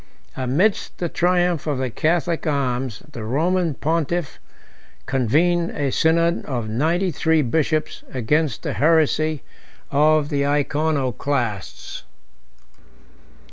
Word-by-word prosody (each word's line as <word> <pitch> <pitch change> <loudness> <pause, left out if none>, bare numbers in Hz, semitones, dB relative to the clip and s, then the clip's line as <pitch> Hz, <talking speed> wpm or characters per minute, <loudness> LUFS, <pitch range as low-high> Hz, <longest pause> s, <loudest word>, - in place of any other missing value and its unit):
Amidst 140 - 0
the 175 - -2
triumph 175 -2 +1
of 145 -3 0
the 130 -2 -2
Catholic 170 +4 0
arms, 130 -5 -1
the 115 -5 -7
Roman 165 +7 0
pontiff 165 +1 -1 0.7
convened 165 +7 +2
a 140 -3 0
synod 170 +3 +2
of 120 -5 -3
ninety 165 - 0
three 160 -1 +2
bishops 155 +4 -1
against 145 +5 0
the - - -2
heresy 155 -1 +2 0.5
of 150 +1 +3
the 140 -2 0
Iconoclasts. 140 - -1
150 Hz, 100 wpm, -22 LUFS, 135-165 Hz, 0.7 s, of